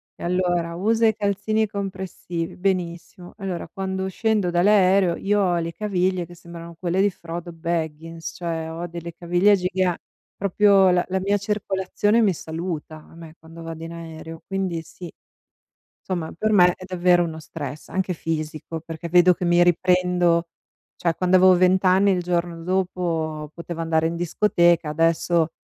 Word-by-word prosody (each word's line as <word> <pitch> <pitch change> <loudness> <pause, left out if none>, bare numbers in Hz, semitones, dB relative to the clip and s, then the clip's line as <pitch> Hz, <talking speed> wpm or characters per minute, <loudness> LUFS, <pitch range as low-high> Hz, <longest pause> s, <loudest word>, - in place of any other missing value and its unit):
E - - -11
allora 175 -1 0
usa 220 +6 +1
i 220 -2 +3
calzini 215 +1 0
compressivi, 190 -4 -5
benissimo. 180 -1 -3
Allora 190 -5 -4
quando 190 0 -3
scendo 215 -2 0
dall'aereo 185 0 +4
io 205 +1 0
ho 180 -3 +2
le 165 0 -4
caviglie 185 -3 -1
che 175 - -14
sembrano 170 0 -11
quelle 175 +2 -1
di 205 0 +3
Frodo 170 0 -7
Baggins, 165 0 -4
cioè 165 -2 -3
ho 170 +2 -5
delle 170 0 -7
caviglie 175 +5 +3
giga 180 -1 0 0.4
proprio 200 0 +4
la 180 -1 +2
la 190 0 -1
mia 200 +2 +1
circolazione 205 +1 0
mi 200 -4 +3
saluta 160 -1 -5
a 155 - -17
me 165 -1 -12
quando 165 +1 -13
vado 165 0 -7
in 165 - -7
aereo, 165 -1 -9
quindi 190 -4 -2
sì. 175 +2 -11 1.0
Somma 175 -4 -3
per 215 - 0
me 180 -4 +6
è - - -12
davvero 180 -1 +3
uno 160 -2 -5
stress 150 -2 -8
anche 190 -1 -1
fisico 160 0 -4
perché 165 +1 -7
vedo 180 +1 +6
che 180 +1 -7
mi 175 0 +4
riprendo 175 -1 +2 0.5
cioè 170 -2 0
quando 185 0 +3
avevo 185 0 +6
vent'anni 185 +2 +4
il 180 -2 +1
giorno 175 -1 -2
dopo 170 -4 -2
potevo 170 0 -6
andare 160 -1 +1
in 165 +1 -1
discoteca, 175 -2 +2
adesso 165 +1 +1
175 Hz, 155 wpm, -23 LUFS, 165-190 Hz, 1.0 s, me